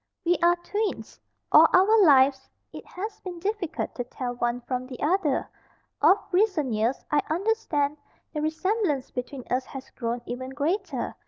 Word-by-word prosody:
"We 350 +1 +4
are 345 +1 +5
twins. 410 +5 -4 0.3
All - - +8
our 410 +3 +6
lives 270 -3 +4 0.2
it - - -8
has 420 +5 -6
been 360 -2 -7
difficult 390 -2 -3
to 245 - -3
tell 245 0 -5
one 240 0 -2
from 255 +1 -4
the 255 -2 -9
other. 315 -3 +1 0.5
Of 345 +7 +6
recent 360 - +2
years, 225 +5 -1
I 295 -1 +3
understand, 315 -6 0 0.4
the 300 - -2
resemblance 315 - -1
between 250 +1 -5
us 255 +1 0
has 270 -1 -10
grown 235 0 -3
even 255 +2 -5
greater. 320 +9 -2
300 Hz, 155 wpm, -26 LUFS, 260-375 Hz, 0.5 s, All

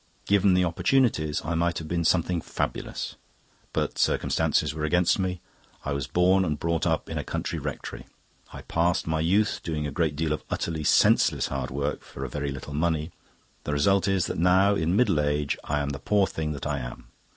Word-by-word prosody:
Given 100 -2 +4
the 90 0 +3
opportunities, 85 - +1
I 80 - -1
might 85 +1 0
have 80 - -5
been 85 +1 -1
something 85 0 +2
fabulous. - - -4 0.5
But - - -2
circumstances - - +1
were 75 0 -5
against 90 +5 +2
me. 90 -2 -2 0.4
I 70 - -1
was 70 -3 -3
born 95 +2 +3
and 75 -5 -2
brought 85 +1 0
up 80 -2 0
in - - -3
a - - -3
country - - -3
rectory; - - -6 0.4
I - - -9
passed 85 +1 +1
my 80 0 -1
youth 95 +7 +2
doing 75 -2 -3
a 75 - -3
great 75 0 0
deal 80 0 0
of 75 - -5
utterly 80 -2 -2
senseless - - +4
hard 65 -2 -3
work 70 +2 -2
for 70 - -7
a - - -5
very 70 +2 -3
little 70 +2 -7
money. 80 +1 0 0.5
The 75 - -2
result 95 +7 +3
is 95 -2 +2
that - - -3
now, 95 +3 +4
in 85 -1 0
middle 105 -8 +3
age, 75 0 0
I 75 0 0
am 70 - -2
the 70 -1 -5
poor 100 +8 +2
thing 80 -4 -3
that 70 - -6
I - - -1
am. - - -8
80 Hz, 200 wpm, -26 LUFS, 75-90 Hz, 0.5 s, Given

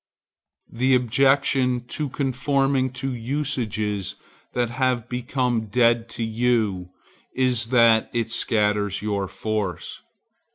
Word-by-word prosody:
The 130 +3 +2
objection 130 0 +2
to 150 +1 -3
conforming 135 0 0
to 130 +1 -3
usages 115 -6 -2 0.4
that 120 -1 -1
have 125 -2 0
become 125 -2 -1
dead 115 +1 +2
to 115 - -2
you 110 -5 0 0.5
is 125 -3 +2
that 115 -2 +4
it 115 -1 -2
scatters 105 -4 +1
your 100 -2 -1
force. 105 -2 -4
120 Hz, 100 wpm, -23 LUFS, 110-130 Hz, 0.5 s, that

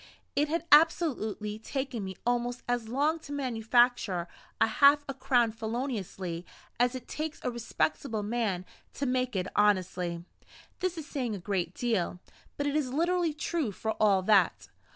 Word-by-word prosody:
It 295 +2 +2
had 335 +1 -1
absolutely 270 -10 +3
taken 260 -2 -3
me 190 0 -5
almost 245 0 0
as 245 -2 -1
long 295 +6 +1
to 290 - -11
manufacture 240 -8 +2 0.3
a - - +6
half 285 +6 +5
a 275 - -3
crown 255 -3 +2
feloniously 220 -7 -4 0.4
as 245 +1 +3
it 255 - -7
takes 310 0 -4
a 250 - 0
respectable 235 -1 -1
man 205 -5 -1 0.3
to 280 - -2
make 255 -2 0
it 185 -1 0
honestly. 180 -4 +1 0.5
This 365 -1 -1
is 320 - -5
saying 250 -7 -3
a - - -6
great 180 -1 -2
deal; 210 -7 -1 0.4
but 285 - -1
it 290 0 0
is 285 -5 0
literally 340 +3 +1
true 305 -5 -1
for 220 +3 -3
all 200 -3 +4
that. 195 -3 +3
240 Hz, 155 wpm, -29 LUFS, 210-285 Hz, 0.5 s, a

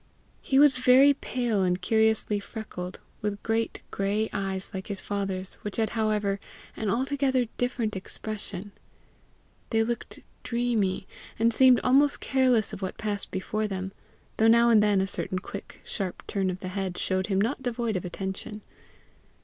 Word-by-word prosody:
He 265 - +1
was 285 -2 +7
very 260 +3 +6
pale 245 -6 -1
and 180 -1 +1
curiously 220 +1 +2
freckled, 195 -4 -7 0.2
with 205 -1 -3
great 225 0 -1
gray 205 +3 0
eyes 190 -1 -3
like 190 -1 -5
his 200 -2 -3
father's, 195 -2 -3
which 210 - -5
had 220 -1 +1
however 210 -3 0 0.4
an 215 - -2
altogether 265 +2 +1
different 245 -4 -1
expression. 205 0 -6 1.0
They 225 -1 +3
looked 235 +1 -4 0.2
dreamy, 230 -6 0 0.3
and 230 +1 +3
seemed 255 0 +6
almost 280 +3 +4
careless 255 -6 +2
of 205 - -6
what 190 - -4
passed 205 -2 -2
before 215 +3 -2
them, 190 -1 -4 0.5
though 220 - +4
now 235 +1 +6
and 215 -2 +6
then 205 -2 +3
a - - +1
certain 190 -1 -2
quick, 195 +2 -8
sharp 190 -3 -3
turn 195 -2 -1
of 185 0 -4
the 185 - -4
head 190 -1 -3
showed 185 0 0
him 195 -2 +1
not 235 +7 0
devoid 240 -3 -1
of 185 - -2
attention. 190 +4 -5
215 Hz, 155 wpm, -27 LUFS, 195-235 Hz, 1.0 s, was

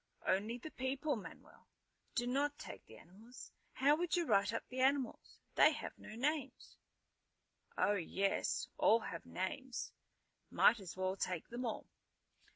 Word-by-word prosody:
"Only 210 +5 +1
the 310 +6 -8
people, 265 +3 -1
Manuel! 215 - -11 0.5
Do 240 - +1
not 285 +4 0
take - - -9
the 110 - -13
animals. 215 - -13 0.2
How 285 +3 +4
would 350 +2 0
you 345 -1 +1
write 200 -6 +3
up 230 - -3
the 255 - -6
animals? 265 0 +1 0.2
They - - +6
have - - -6
no 215 - -9
names." 290 +5 -2 1.0
"Oh, 205 - +3
yes. 195 +1 0
All 225 +1 +5
have 165 - -6
names. 240 +7 -3 0.6
Might 235 - +5
as 185 -2 -8
well 185 0 0
take 180 -3 -2
them 240 +1 -3
all." 220 - -4
240 Hz, 150 wpm, -37 LUFS, 195-270 Hz, 1.0 s, They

